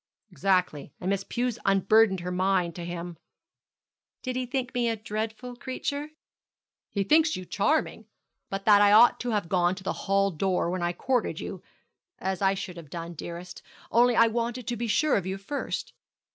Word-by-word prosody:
'Exactly; 180 -7 0
and 185 +2 -1
Miss 195 -1 0
Pew 245 +4 -1
unburdened 195 0 +4
her 180 +1 -4
mind 180 -1 +1
to 175 - -7
him.' 175 0 -6 1.0
'Did 255 -1 -3
he 255 0 -2
think 255 0 -3
me 240 -2 +1
a 225 - 0
dreadful 220 +3 -5
creature?' 285 +4 -4 0.8
'He 200 - -1
thinks 315 +8 +4
you 185 - -6
charming, 220 - 0 0.4
but 195 0 -4
that 205 -1 +7
I 205 0 +6
ought 230 +3 +7
to 245 - -3
have 210 -6 0
gone 180 0 +2
to 190 - -11
the - - -1 0.2
hall 195 0 +3
door 180 0 0
when 185 0 -2
I 175 0 +1
courted 250 +6 -1
you; - - -6 0.6
as 190 0 -3
I 195 0 +3
should 185 -2 -6
have 160 -4 -10
done, 170 +1 -6
dearest, 170 +2 -8 0.3
only 240 +1 +4
I 230 - +6
wanted 235 +1 -2
to 240 - -1
be 235 +1 -3
sure 295 +7 +3
of 190 -2 -3
you 190 +1 -3
first. 240 +9 -4
200 Hz, 185 wpm, -27 LUFS, 180-240 Hz, 1.0 s, that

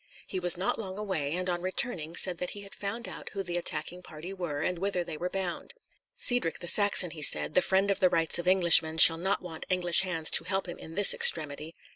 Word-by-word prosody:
He 190 - -5
was 175 -1 0
not 190 +4 -2
long 190 -3 -7
away, 175 -9 -4
and 180 +1 -3
on 175 -1 -3
returning 180 -3 -4
said 180 -1 -1
that 180 - -4
he - - -8
had 200 0 -13
found 210 +4 -6
out - - -9
who 195 -1 -4
the 175 -1 -6
attacking 175 +1 -4
party 170 +2 -10
were 165 -6 -5
and 180 0 -3
whither 190 -2 -2
they 170 -2 -8
were 175 +4 -5
bound. 185 - -6 0.4
"Cedric 245 -10 +1
the 175 - -9
Saxon," 200 -2 +2
he 155 - -10
said, - - +3
"the 185 - +3
friend 195 +2 +1
of 195 - -2
the 185 -2 +3
rights 165 -1 0
of 175 - -6
Englishmen, 170 -3 +5
shall 165 0 +8
not 190 +3 -2
want 165 -3 -9
English 180 -2 +3
hands 170 -4 -2
to - - +6
help 195 +2 -3
him 175 - -8
in 160 - -11
this 205 0 +5
extremity. 155 0 +1
180 Hz, 235 wpm, -28 LUFS, 165-190 Hz, 0.4 s, shall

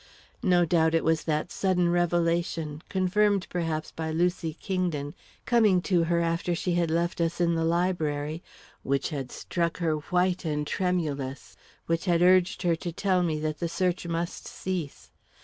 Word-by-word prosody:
No 180 -5 +4
doubt, 160 0 +3
it 165 - +2
was 160 0 +1
that 155 +1 -1
sudden 185 -2 +1
revelation, 170 -3 0
confirmed, 195 +1 +2
perhaps, 165 -3 -2
by 160 0 -4
Lucy 165 -1 0
Kingdon, 175 -7 -2 0.3
coming 220 -6 +4
to 175 -3 +2
her 170 0 +1
after 170 +1 0
she 175 +1 -1
had 170 -1 +1
left 170 +1 0
us 165 +1 -1
in 170 -1 +2
the 165 0 0
library, 160 -3 0 0.4
which 140 0 0
had 135 -5 -5
struck 170 -2 -2
her 160 -3 0
white 180 +1 +1
and 150 -2 -1
tremulous, 150 -7 -2 0.3
which 165 +1 -1
had 175 -2 +3
urged 185 +1 +4
her 170 -2 +3
to 175 - -5
tell 185 +1 +1
me 160 -3 0
that 155 -1 -2
the 170 - -2
search 180 0 -1
must 170 +1 -3
cease. 180 -6 -5
170 Hz, 165 wpm, -27 LUFS, 160-180 Hz, 0.4 s, No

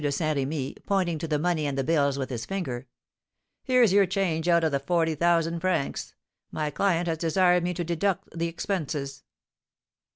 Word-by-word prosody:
de 145 - +1
Saint 155 +1 0
Remy, 140 0 -2
pointing 185 -5 +1
to 165 - -4
the 150 -1 +1
money 160 -1 0
and 140 -1 -3
the 135 - +1
bills 140 -2 +2
with 130 -1 -4
his 115 -2 -3
finger: 135 -10 -4 0.8
"Here's 250 -6 +4
your 200 -1 +5
change 175 -3 -1
out 170 -1 +4
of 160 - +2
the 140 - +1
forty 165 +3 +1
thousand 170 +1 +1
francs; 180 -5 -2 0.3
my 150 -1 -3
client 175 0 +1
has 165 -1 -1
desired 180 +2 +3
me 180 0 -1
to 175 - -2
deduct 175 +3 -1
the 170 0 -1
expenses." 155 -6 -3
165 Hz, 185 wpm, -26 LUFS, 145-180 Hz, 0.8 s, your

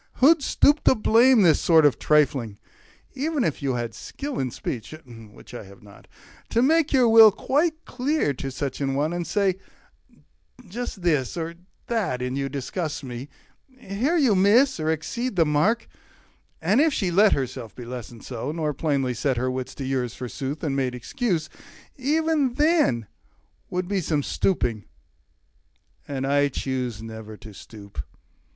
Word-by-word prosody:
Who'd 305 +4 +5
stoop 290 +2 +3
to - - +6
blame 230 +1 +5
This 165 -4 +5
sort 160 -3 +5
of 145 - +3
trifling? 135 -8 +1 0.6
Even 290 0 -1
had 155 - -2
you 135 -3 -1
skill 275 - -6
In 130 - -1
speech 120 +4 -6
(which 115 -2 -14
I 120 - -7
have 100 +1 -16
not) 100 -1 -16 0.4
to 235 - +2
make 320 +2 +3
your 255 -3 +4
will 225 -1 +8
Quite 310 - -1
clear 265 - -1
to 135 +1 -5
such 135 +1 -4
an 135 -1 -1
one, 150 +4 0
and 175 -1 -3
say, 195 -3 0 1.1
"Just 210 -1 -6
this 150 -5 0
Or 165 0 -3 0.3
that 205 - -1
in 125 +1 -3
you 135 0 -2
disgusts 145 +4 -4
me; 125 +2 -7 0.5
here 255 - -1
you 270 -9 +4
miss, 220 +6 +4
Or 155 - -3
there 160 - +2
exceed 235 +10 -4
the 165 -2 +4
mark" 155 +11 +1 0.8
and 205 - +3
if 320 0 +3
she 190 -5 -1
let 205 +4 +5
Herself 130 -4 -4
be 125 - -9
lessoned 120 -2 -8
so, 125 +3 -4
nor 155 -2 -2
plainly 135 -3 -1
set 130 +3 -1
40 - - -2
Her 130 +1 -1
wits 130 0 -5
to 135 - -5
yours, 130 -3 -2
forsooth, 135 +4 -5
and 145 -4 -1
made 130 -2 -1
excuse, 165 - -2 0.5
E'en 295 -1 +1
that 300 - +2 0.7
would 180 0 -2
be 195 -1 -1
some 150 -3 -1
stooping; 120 - -1 1.2
and 135 -2 -3
I 145 +1 +3
choose 125 -5 -4
Never 110 -1 -9
to 105 0 -12
stoop. 100 -6 -9
155 Hz, 165 wpm, -24 LUFS, -, 1.2 s, will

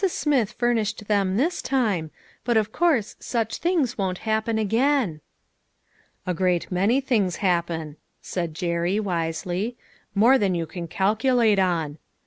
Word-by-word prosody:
Smith 285 - 0
furnished 225 -3 0
them 195 -2 +1
this 325 +9 0
time, 210 - 0 0.3
but 240 -2 +2
of 215 -1 +1
course 300 -10 +1
such 225 -3 -2
things 320 - 0
won't 185 -2 -1
happen 220 +1 0
again." 225 - +1 1.0
"A 180 - 0
great 180 0 0
many 200 +8 +2
things 215 -10 +1
happen," 170 -5 -1 0.2
said 170 -4 -4
Jerry, 170 +4 0
wisely. 180 +4 -2 0.2
" - - -35
More 240 +6 +5
than 195 -3 +1
you 165 -1 -1
can 170 +1 -7
calculate 215 +4 +2
on. 165 -5 0
205 Hz, 135 wpm, -24 LUFS, 175-240 Hz, 1.0 s, More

